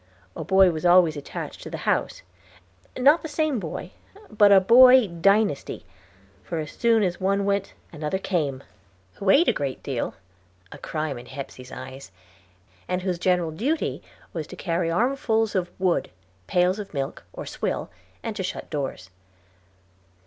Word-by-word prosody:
A - - -5
boy 190 -1 +5
was 160 0 -5
always 175 -3 +5
attached 145 - -7
to - - -8
the - - -5
house; - - 0 0.7
not 285 +6 +5
the - - -5
same 300 -4 0
boy, - - -6 0.4
but 210 -1 +5
a 195 - +8
Boy 250 +5 +7
dynasty, 195 -1 +1 0.6
for 165 - -5
as 155 -2 -4
soon 230 -2 +2
as 180 -1 -2
one 195 +1 +1
went 200 0 -1 0.2
another 155 +3 -2
came, 150 -8 -2 0.5
who 195 - -2
ate 305 - +6
a - - +4
great 135 -2 -4
deal 130 -4 -3 0.6
a - - -10
crime 155 -5 -4
in 120 - -13
Hepsey's 130 -1 -9
eyes 130 -3 -9 0.8
and 180 0 -2
whose 180 -2 -2
general 180 -3 +1
duty 270 - -2 0.3
was 160 -3 -4
to - - -10
carry 170 -1 -1
armfuls 225 - +1
of 180 -2 -1
wood, 185 -2 +1 0.4
pails 180 +3 +2
of 200 -6 -8
milk, 135 0 -4
or - - -8
swill, - - -3 0.3
and 225 -2 -4
to 205 - -3
shut 185 - -5
doors. 135 - -4
185 Hz, 155 wpm, -24 LUFS, 155-215 Hz, 0.8 s, a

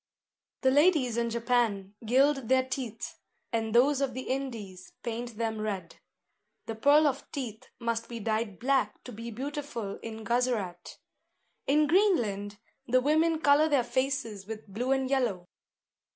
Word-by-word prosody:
The 260 - +4
ladies 290 -5 +4
in 235 0 0
Japan 230 -4 0
gild 265 +2 +3
their 260 0 +4
teeth; 245 -4 -5 0.3
and 225 -1 0
those 270 +3 +4
of 265 -3 -1
the 260 - -3
Indies 215 -10 -5
paint 235 -1 -4
them 220 -1 -2
red. 195 -6 -4 0.7
The 225 - -4
pearl 285 +7 +5
of 280 -2 -1
teeth 255 -3 -6
must 230 -1 -2
be 235 -1 -5
dyed 220 -2 -1
black 270 +3 0
to 250 - -9
be 230 +1 -7
beautiful 260 -4 -5
in 225 -1 -7
Guzerat. 230 -7 -1 0.7
In 300 +2 +4
Greenland 235 - +2 0.3
the 255 +1 +4
women 315 +4 +2
colour 290 +2 +5
their 280 -4 +3
faces 250 -6 -2
with 220 -1 -7
blue 235 +7 -2
and 265 -1 +2
yellow. 240 -10 0
240 Hz, 145 wpm, -29 LUFS, 220-275 Hz, 0.7 s, pearl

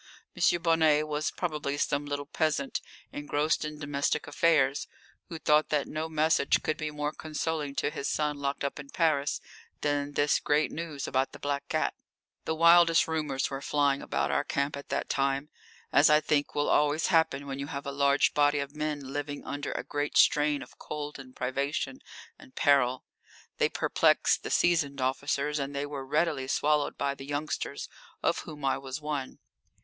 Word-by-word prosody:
M. 175 - +3
Bonnet 160 -2 +3
was 150 0 -1
probably 150 -5 -3
some 145 0 -1
little 145 0 -3
peasant 150 -2 -1 0.3
engrossed 145 +2 0
in 150 0 -5
domestic 145 -1 -1
affairs, 145 -2 +2 0.4
who 165 - -5
thought 155 -1 +3
that 150 -2 0
no 155 +1 -4
message 155 -2 +2
could 155 - 0
be 155 -1 -3
more 150 0 -3
consoling 155 -2 -3
to - - 0
his 140 - -3
son 150 -1 -1
locked 140 0 -2
up 140 +1 -3
in 140 -1 -9
Paris 150 -4 +1 0.4
than 145 0 -1
this 145 +1 +2
great 150 +1 +1
news 160 -4 -5
about 130 +1 0
the - - -9
black 140 0 -3
cat. - - 0 0.5
The 160 - -1
wildest 170 0 +6
rumours 150 -5 -1
were 135 0 -4
flying 140 -1 +1
about - - -1
our - - +1
camp 140 +1 -1
at 140 - -9
that - - -1
time, 140 +1 0 0.4
as 145 - +6
I 150 0 +6
think 150 -1 0
will 145 - +1
always 150 +2 +2
happen 145 -4 +2
when 135 -1 -5
you 140 - -4
have 140 -1 -5
a 140 - -3
large 140 0 +3
body 145 0 +3
of 140 +1 -4
men 150 -3 -3
living 145 0 -4
under 145 0 -4
a - - -3
great 145 0 -2
strain 150 -1 +4
of - - -17
cold 150 -1 -6
and 130 -1 -12
privation 140 - -2 0.4
and 270 -3 -16
peril. 130 -3 +3 0.5
They - - +3
perplexed - - +2
the - - -5
seasoned 155 -5 +2
officers 140 +3 0
and 140 0 -4
they 140 +1 -1
were 145 -2 -6
readily 150 -2 0
swallowed 150 +2 +1
by 140 - 0
the 135 0 -10
youngsters, 145 +2 -3 0.4
of - - +2
whom 150 -3 -7
I 135 - +1
was 135 +1 -6
one. 150 -3 -4
145 Hz, 180 wpm, -29 LUFS, 140-155 Hz, 0.5 s, wildest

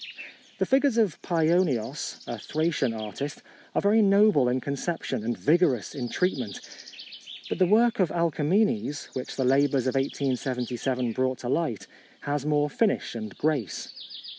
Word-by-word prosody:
The - - +1
figures 270 -2 +2
of 215 -8 +1
Paionios, 160 -7 0
a 120 - -5
Thracian 155 -2 0
artist, 115 +6 -6 0.3
are - - +2
very 210 +2 +4
noble 200 -9 +5
in 125 +1 +1
conception 140 -2 -3
and 120 +2 -2
vigorous 150 - +2
in 125 -4 -4
treatment; 130 - -1 0.9
but - - -3
the 185 - +4
work 230 +4 +3
of 185 -4 +3
Alkamenes, 170 +2 0
which 130 - -5
the 130 - 0
labours 135 0 +3
of 130 - 0
1877 130 -2 -1
brought 130 +2 0
to 120 - -6
light, 145 - -1 0.4
has 145 0 -2
more 150 -1 +2
finish 210 +8 0
and 110 -3 -7
grace. 145 - -1
145 Hz, 140 wpm, -26 LUFS, 125-175 Hz, 0.9 s, noble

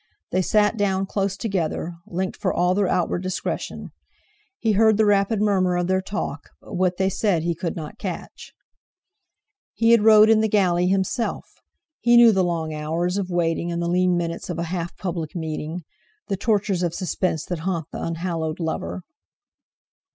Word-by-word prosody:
They 185 - +2
sat 210 +3 +2
down 195 -2 +1
close 195 0 -2
together, 175 -6 -2
linked 185 +2 -3
for - - -1
all 180 +1 +2
their 200 0 +1
outward 180 0 0
discretion. 185 0 -4 0.7
He 225 - +1
heard 215 +1 +4
the 220 - +4
rapid 205 +1 +2
murmur 190 -4 +2
of 175 - 0
their 190 +1 +1
talk; 190 -6 -5
but - - -13
what 180 -1 +1
they 190 - +1
said 190 -3 0
he 170 0 0
could 170 +1 -4
not 155 -3 -7
catch. - - -7 1.2
He 230 0 +3
had 235 -2 +6
rowed 215 0 +7
in 220 -1 +5
the 220 - +2
galley 180 -4 +2
himself! 195 +5 -1 0.5
He 240 0 +5
knew 235 -1 +8
the 190 -3 +2
long 165 -3 -2
hours 165 +5 -1
of 190 -2 -3
waiting 170 -1 0
and 170 - -2
the 170 - -1
lean 180 0 +2
minutes 170 0 -3
of 175 - -3
a 170 - -1
half 170 -2 -4
public 170 -4 -4
meeting; 160 +1 -4 0.5
the 195 - +1
tortures 200 -2 0
of 170 -1 -1
suspense 180 -3 -1
that 175 -2 -4
haunt 170 -1 -2
the - - -6
unhallowed 165 -1 -3
lover. 90 - -3
180 Hz, 175 wpm, -23 LUFS, 170-200 Hz, 1.2 s, knew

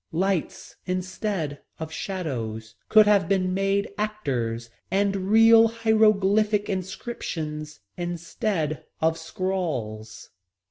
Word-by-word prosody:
Lights 185 0 -2
instead 185 -4 -3 0.2
of 160 -1 -5
shadows 115 - -4 0.2
could 215 -1 +7
have 205 -2 +3
been 185 -2 +1
made 195 +1 +1
actors 120 - -2 0.2
and 200 +1 +1
real 225 +1 +7
hieroglyphic 215 -2 +3
inscriptions 165 -6 -5 0.2
instead 175 -1 -2 0.2
of 160 0 +2
scrawls. 160 - -4
185 Hz, 90 wpm, -25 LUFS, 155-205 Hz, 0.2 s, could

